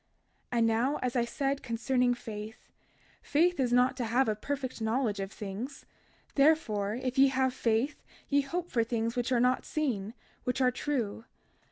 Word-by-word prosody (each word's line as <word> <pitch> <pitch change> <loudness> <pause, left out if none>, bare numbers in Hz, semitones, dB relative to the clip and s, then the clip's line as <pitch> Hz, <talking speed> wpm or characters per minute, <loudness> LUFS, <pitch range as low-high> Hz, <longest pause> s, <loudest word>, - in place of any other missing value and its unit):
32:21 240 - 0
And 230 - +4
now 235 +6 +2
as 250 0 -1
I 240 -1 +2
said 275 +3 -1
concerning 245 0 +1
faith—faith 240 +9 -3
is 250 -2 +1
not 250 +1 +4
to 245 - -1
have 240 +3 +2
a 215 - +1
perfect 260 +2 -4
knowledge 220 -2 0
of 195 0 -4
things; 220 +8 -6 0.5
therefore 235 -9 +3
if 260 +1 -2
ye 275 - +8
have 260 -1 +1
faith 240 +4 0 0.3
ye 285 0 +3
hope 345 +5 -4
for 230 -2 +2
things 230 0 -1
which 245 +1 -1
are 245 - +3
not 250 +1 +2
seen, 235 -8 -2 0.3
which 250 +1 -1
are 255 -1 +4
true. 245 -5 -2
250 Hz, 170 wpm, -30 LUFS, 225-270 Hz, 0.5 s, ye